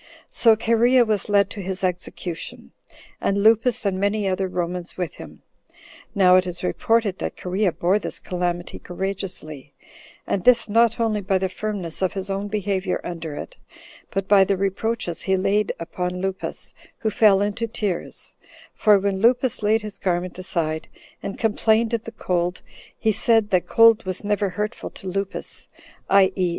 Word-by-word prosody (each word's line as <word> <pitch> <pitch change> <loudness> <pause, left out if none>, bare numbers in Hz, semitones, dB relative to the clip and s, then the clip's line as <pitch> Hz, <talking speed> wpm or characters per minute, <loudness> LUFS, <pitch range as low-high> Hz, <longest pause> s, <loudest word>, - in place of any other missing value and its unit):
So 225 -2 +5
Cherea 235 +3 +4
was 215 -2 -1
led 200 -1 +3
to 205 - -6
his 190 +1 -4
execution, 180 -1 -4 0.5
and 200 0 +1
Lupus 225 +2 +3
and 190 -2 0
many 205 +1 0
other 190 0 0
Romans 180 -1 -4
with 180 -5 -3
him. - - -12 0.7
Now 185 -2 +6
it 185 0 +2
is 175 0 -6
reported 215 +1 +1
that - - -4
Cherea 185 +1 0
bore 185 +5 +1
this - - -5
calamity 175 -1 -3
courageously; 180 -6 -6 0.5
and 190 - -1
this 250 -3 +5
not 230 +2 +3
only 220 -2 +1
by 195 0 +1
the 190 0 -1
firmness 190 -4 -4
of 185 - +1
his 195 0 -3
own 195 +1 -2
behavior 200 -2 -1
under 165 -3 -5
it, - - -8 0.5
but 195 -1 -3
by 200 -1 +6
the 195 0 0
reproaches 195 -1 -2
he 190 -1 +1
laid 200 +2 +1
upon 180 +2 -4
Lupus, 190 0 -4 0.2
who 220 - -1
fell 205 -2 +5
into 205 +3 -1
tears; 205 -5 -4 0.4
for 210 -2 +5
when 195 0 -1
Lupus 245 +1 +3
laid 215 +1 +2
his 210 -2 -7
garment 180 0 -2
aside, 165 -4 -2 0.3
and 200 - -5
complained 225 +1 +2
of 230 -1 -1
the 230 - -6
cold 180 -4 -2
14 - - -26 0.2
he 220 - +2
said, 225 0 +2
that 185 -2 +2
cold 230 -1 +6
was 185 +1 -3
never 205 -1 0
hurtful 210 +5 -4
to 190 - -11
Lupus 195 +1 -4 0.4
[i.e. 190 -2 +4
195 Hz, 165 wpm, -23 LUFS, 180-215 Hz, 0.7 s, Now